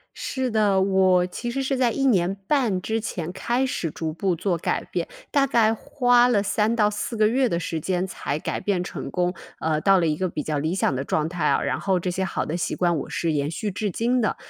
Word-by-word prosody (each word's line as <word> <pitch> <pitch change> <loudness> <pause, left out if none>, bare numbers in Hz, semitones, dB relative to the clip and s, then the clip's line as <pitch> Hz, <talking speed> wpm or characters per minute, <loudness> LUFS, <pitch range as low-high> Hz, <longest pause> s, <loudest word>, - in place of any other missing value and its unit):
是 260 -1 -2
的， 210 -4 +2
我 190 -2 +3
其 240 +6 -5
实 270 +3 -2
是 270 0 0
在 250 -2 +2
1 270 +4 -1
年 190 -6 +3
半 235 -11 +1
之 220 +4 -1
前 175 -6 -4
开 240 +7 0
始 170 - -2
逐 160 +1 -4
步 180 +3 -1
做 175 +1 -1
改 165 - -1
变， - - -3 0.2
大 280 -1 +3
概 225 -4 +3
花 245 +1 +3
了 230 -5 +3
3 210 +3 +1
到 210 -2 +3
4 210 +3 -4
个 215 -1 +4
月 255 +4 +2
的 170 -7 -1
时 165 -1 -3
间 180 +3 -1
才 145 -5 -3
改 - - -3
变 190 -3 0
成 - - -6
功， 180 0 0 0.3
呃， 155 -1 0
到 195 +1 +5
了 170 - +2
一 155 - +1
个 185 +1 0
比 160 - -4
较 155 -1 -2
理 155 +4 -1
想 190 - +1
的 130 - -2
状 155 +2 -1
态 175 0 -2
啊， - - +2
然 - - -1
后 190 -2 +1
这 180 +1 -2
些 190 +1 -1
好 190 - -2
的 160 - -3
习 175 - -2
惯， 175 -2 +1
我 140 - -5
是 165 - -1
延 145 -1 0
续 205 +5 -3
至 205 +1 -2
今 240 +7 +1
的。 215 - +1
190 Hz, 255 characters per minute, -24 LUFS, 170-230 Hz, 0.3 s, 到